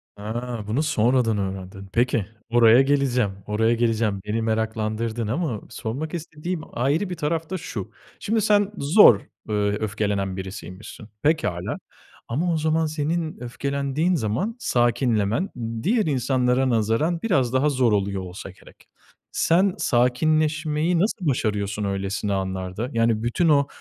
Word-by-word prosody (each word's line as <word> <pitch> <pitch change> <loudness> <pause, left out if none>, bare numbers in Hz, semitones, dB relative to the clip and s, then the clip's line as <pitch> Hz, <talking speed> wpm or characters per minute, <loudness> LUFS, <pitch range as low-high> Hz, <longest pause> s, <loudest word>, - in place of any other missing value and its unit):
Ha! 115 +2 -5
Bunu 125 +8 0
sonradan 120 -5 +2
öğrendin. 95 0 -5
Peki, 120 -3 +1 0.2
oraya 120 +1 +6
geleceğim, 135 -6 +2 0.2
oraya 110 +2 +2
geleceğim. 115 -4 0
Beni 110 +2 -1
meraklandırdın 110 0 -1
ama 125 - -2
sormak 125 +7 -5
istediğim 165 +1 -4
ayrı 145 +10 0
bir 180 - -3
taraf 160 +1 -2
da 190 - -2
şu; 110 - -6 0.3
şimdi 220 +1 0
sen 205 0 +3
zor, 140 - +7 0.3
aaa, - - -3
öfkelenen 105 -2 -1
birisiymişsin. 95 +2 -8
Pekâlâ. 145 - 0 0.5
Ama 165 +8 0
o - - +1
zaman 160 +1 +1
senin 155 +1 -2
öfkelendiğin 140 +7 -1
zaman 135 - -1
sakinlemen 120 - +1 0.3
diğer 215 +4 +2
insanlara 130 -1 +1
nazaran 115 +9 +1
biraz 130 - +1
daha 135 +3 +3
zor 125 -5 +2
oluyor 100 -1 0
olsa 90 +1 -8
gerek. 95 - -18 0.4
Sen 180 +3 +2
sakinleşmeyi 155 +6 +1
nasıl 195 -3 0
başarıyorsun 105 -5 -1
öylesine 100 +1 -2
anlarda? 95 +3 -3
Yani 115 -1 +1
bütün 160 +8 +1
o 140 -1 +4
120 Hz, 130 wpm, -24 LUFS, 105-155 Hz, 0.5 s, zor